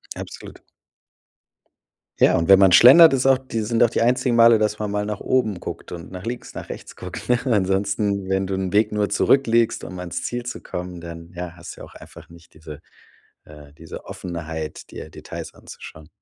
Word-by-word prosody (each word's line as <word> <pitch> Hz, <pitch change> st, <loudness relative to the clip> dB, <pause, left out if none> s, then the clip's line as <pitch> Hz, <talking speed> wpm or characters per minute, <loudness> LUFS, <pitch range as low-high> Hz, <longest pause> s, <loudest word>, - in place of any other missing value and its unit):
Absolut. -, -, -10 dB, 1.6 s
Ja, -, -, +4 dB
und 80 Hz, -, -1 dB
wenn 95 Hz, -1 st, +7 dB
man 95 Hz, -2 st, +5 dB
schlendert, 140 Hz, -, +8 dB
ist 130 Hz, -1 st, 0 dB
auch 135 Hz, -1 st, +5 dB
die 130 Hz, -3 st, -6 dB
sind 115 Hz, +2 st, +1 dB
auch 120 Hz, -, +4 dB
die -, -, -2 dB
einzigen 120 Hz, 0 st, +1 dB
Male, 115 Hz, 0 st, +6 dB
dass 105 Hz, 0 st, -1 dB
man 105 Hz, -1 st, -3 dB
mal 105 Hz, 0 st, -2 dB
nach 105 Hz, -1 st, -5 dB
oben 110 Hz, -8 st, -1 dB
guckt -, -, -8 dB
und 85 Hz, +1 st, -9 dB
nach 90 Hz, 0 st, -8 dB
links 120 Hz, +1 st, -6 dB
nach -, -, -9 dB
rechts -, -, -9 dB
guckt, -, -, -9 dB
ne? 125 Hz, 0 st, +3 dB
Ansonsten, 100 Hz, -2 st, 0 dB
wenn 95 Hz, 0 st, 0 dB
du 95 Hz, -, -4 dB
'n 95 Hz, -1 st, -3 dB
Weg 105 Hz, +1 st, +2 dB
nur 105 Hz, -1 st, 0 dB
zurückliegst, 115 Hz, -4 st, +2 dB
um 90 Hz, -1 st, -8 dB
ans 90 Hz, -1 st, -5 dB
Ziel 120 Hz, 0 st, -4 dB
zu 125 Hz, -, -6 dB
kommen, 90 Hz, -1 st, -7 dB
dann 85 Hz, 0 st, -10 dB
ja, 90 Hz, 0 st, -6 dB
hast 85 Hz, -, -10 dB
du -, -, -14 dB
ja -, -, -8 dB
auch -, -, -17 dB
einfach -, -, -14 dB
nicht 85 Hz, 0 st, -18 dB
diese 75 Hz, -2 st, -11 dB, 0.7 s
äh, 75 Hz, -1 st, -15 dB
diese 80 Hz, +1 st, -11 dB
Offenheit, 80 Hz, -3 st, -7 dB
dir -, -, -9 dB
Details -, -, -9 dB
anzuschauen. 80 Hz, -1 st, -13 dB
100 Hz, 200 wpm, -22 LUFS, 85-115 Hz, 1.6 s, schlendert